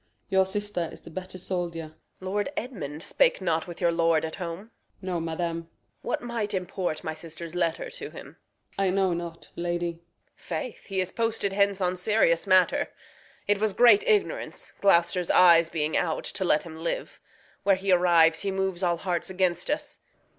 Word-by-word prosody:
Your 190 Hz, -1 st, +3 dB
sister 205 Hz, -4 st, -2 dB
is -, -, -12 dB
the -, -, -12 dB
better 185 Hz, +2 st, -7 dB
soldier. 170 Hz, -3 st, -4 dB
Reg. -, -, -26 dB, 0.3 s
Lord 205 Hz, +7 st, -2 dB
Edmund 160 Hz, -, -5 dB
spake -, -, +2 dB
not 165 Hz, -3 st, 0 dB
with 175 Hz, -, -8 dB
your 170 Hz, -, +3 dB
lord 165 Hz, -1 st, +2 dB
at 160 Hz, -, -6 dB
home? 180 Hz, +5 st, -6 dB, 0.3 s
Osw. 185 Hz, -, -13 dB
No, 180 Hz, -2 st, -1 dB
madam. 165 Hz, +1 st, -2 dB
Reg. 165 Hz, 0 st, -8 dB, 0.3 s
What -, -, -2 dB
might 225 Hz, -4 st, -2 dB
import 180 Hz, -3 st, -3 dB
my 160 Hz, -, -3 dB
sister's 165 Hz, +1 st, -8 dB
letter 175 Hz, -, -1 dB
to -, -, -6 dB
him? -, -, -11 dB
Osw. -, -, -11 dB
I 195 Hz, -, +3 dB
know 190 Hz, -1 st, +2 dB
not, 170 Hz, -1 st, -6 dB
lady. 175 Hz, 0 st, -1 dB
Reg. 170 Hz, 0 st, -18 dB, 0.3 s
Faith, 175 Hz, +8 st, -6 dB
he 195 Hz, -2 st, 0 dB
is 185 Hz, 0 st, -2 dB
posted 225 Hz, -4 st, -1 dB
hence 200 Hz, 0 st, +2 dB
on 180 Hz, 0 st, +1 dB
serious 180 Hz, -3 st, +2 dB
matter. 185 Hz, -1 st, +4 dB, 0.6 s
It 205 Hz, 0 st, +2 dB
was 215 Hz, -1 st, +1 dB
great 245 Hz, -, +6 dB
ignorance, 440 Hz, +3 st, 0 dB
Gloucester's 175 Hz, -2 st, +3 dB
eyes 170 Hz, -2 st, +6 dB
being 155 Hz, -2 st, -1 dB
out, 160 Hz, -2 st, 0 dB
To 195 Hz, -, -3 dB
let 155 Hz, -4 st, +3 dB
him 160 Hz, -2 st, -9 dB
live. 165 Hz, +1 st, -4 dB, 0.4 s
Where 200 Hz, -1 st, +4 dB
he 190 Hz, +1 st, -1 dB
arrives 170 Hz, -2 st, +5 dB
he 200 Hz, -, -1 dB
moves 190 Hz, -1 st, -1 dB
All 175 Hz, -2 st, +1 dB
hearts 175 Hz, 0 st, -2 dB
against 180 Hz, -2 st, 0 dB
us. 295 Hz, -, -3 dB
180 Hz, 185 wpm, -27 LUFS, 170-195 Hz, 0.6 s, great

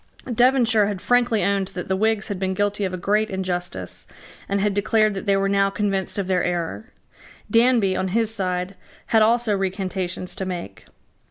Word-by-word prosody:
Devonshire 240 Hz, -3 st, +4 dB
had 205 Hz, -2 st, -3 dB
frankly 245 Hz, 0 st, +2 dB
owned 200 Hz, -1 st, +1 dB
that 180 Hz, -, -5 dB
the 190 Hz, -, 0 dB
Whigs 220 Hz, +2 st, 0 dB
had 200 Hz, -3 st, -3 dB
been 190 Hz, 0 st, -1 dB
guilty 205 Hz, +1 st, 0 dB
of 185 Hz, -, -2 dB
a 185 Hz, -, -4 dB
great 210 Hz, +4 st, +1 dB
injustice, 180 Hz, -, -4 dB, 0.4 s
and 200 Hz, 0 st, +1 dB
had 205 Hz, 0 st, +1 dB
declared 215 Hz, +1 st, +2 dB
that 195 Hz, +2 st, -6 dB
they 200 Hz, 0 st, +3 dB
were 195 Hz, 0 st, +1 dB
now 195 Hz, 0 st, +2 dB
convinced 195 Hz, -1 st, -2 dB
of 200 Hz, -, -1 dB
their 180 Hz, -1 st, +1 dB
error. 165 Hz, -, -3 dB, 0.6 s
Danby, 230 Hz, -4 st, +4 dB
on 190 Hz, -, -1 dB
his 220 Hz, +3 st, 0 dB
side, 185 Hz, -2 st, -2 dB, 0.4 s
had 220 Hz, -, +6 dB
also 225 Hz, -1 st, +3 dB
recantations 185 Hz, -2 st, -3 dB
to -, -, -4 dB
make. 175 Hz, -, -6 dB
195 Hz, 180 wpm, -23 LUFS, 185-215 Hz, 0.6 s, had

